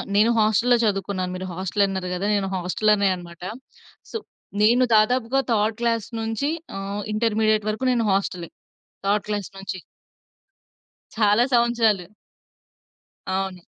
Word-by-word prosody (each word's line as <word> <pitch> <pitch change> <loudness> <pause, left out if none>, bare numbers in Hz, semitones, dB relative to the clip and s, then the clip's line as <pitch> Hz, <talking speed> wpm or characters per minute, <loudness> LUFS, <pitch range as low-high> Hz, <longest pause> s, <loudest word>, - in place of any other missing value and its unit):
నేను 215 +3 +5
హాస్టల్‌లో 220 +3 +4
చదువుకున్నాను. 195 -3 -1
మీరు 185 +1 -5
హాస్టలన్నారు 190 0 -1
గదా! 185 +3 -2
నేను 195 -1 0
హాస్టల్‌లోనే 200 +3 +2
అనమాట. 170 -1 -12 0.7
సో, 455 - -2 0.4
నేను 240 +4 +5
దాదాపుగా 245 +4 +3
థర్డ్ 215 0 +1
క్లాస్ 230 -2 0
నుంచి 225 +6 -1 0.3
ఆహ్, 200 +1 -4
ఇంటర్మీడియేట్ 215 -1 +1
వరుకు 220 +5 -2
నేను 235 -3 +1
హాస్టలే 185 -3 -1 0.6
థర్డ్ 205 +1 +1
క్లాస్ 205 -2 -2
నుంచి. 190 -1 -5 1.4
చాలా 215 +1 +4
సంవత్సరాలు. 230 -6 +3 1.3
అవును. 190 -2 -3
210 Hz, 115 wpm, -23 LUFS, 190-225 Hz, 1.4 s, నేను